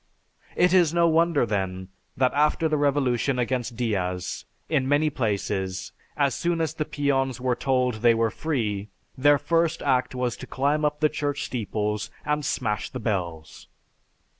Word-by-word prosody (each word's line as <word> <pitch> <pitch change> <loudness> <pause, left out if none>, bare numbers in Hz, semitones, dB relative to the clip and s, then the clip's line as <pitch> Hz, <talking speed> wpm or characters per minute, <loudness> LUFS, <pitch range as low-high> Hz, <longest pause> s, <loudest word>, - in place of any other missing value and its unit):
It 180 0 +3
is 175 -3 +4
no 170 0 +4
wonder 165 -4 +3
then, 95 -3 -3 0.3
that 130 0 +2
after 150 +2 +2
the 155 - 0
revolution 140 -3 +1
against 125 -1 -1
Diaz, 90 -6 -2 0.2
in 135 -4 0
many 150 +2 +3
places, 100 -5 -2 0.3
as 140 -2 +2
soon 170 -1 -1
as 160 -2 -1
the 155 -1 -2
peons 135 -4 0
were 125 0 +1
told 125 -4 0
they 120 -1 +5
were 115 -1 +1
free, 105 -10 -2 0.3
their 145 +2 +5
first 165 +2 0
act 130 -2 +1
was 125 -2 -1
to - - -9
climb 145 +3 0
up 150 0 -1
the 155 - +5
church 145 -2 -2
steeples 105 -3 -2 0.2
and 150 0 0
smash 105 -6 -1
the 130 - -6
bells. 85 -8 -4
130 Hz, 160 wpm, -25 LUFS, 110-150 Hz, 0.3 s, they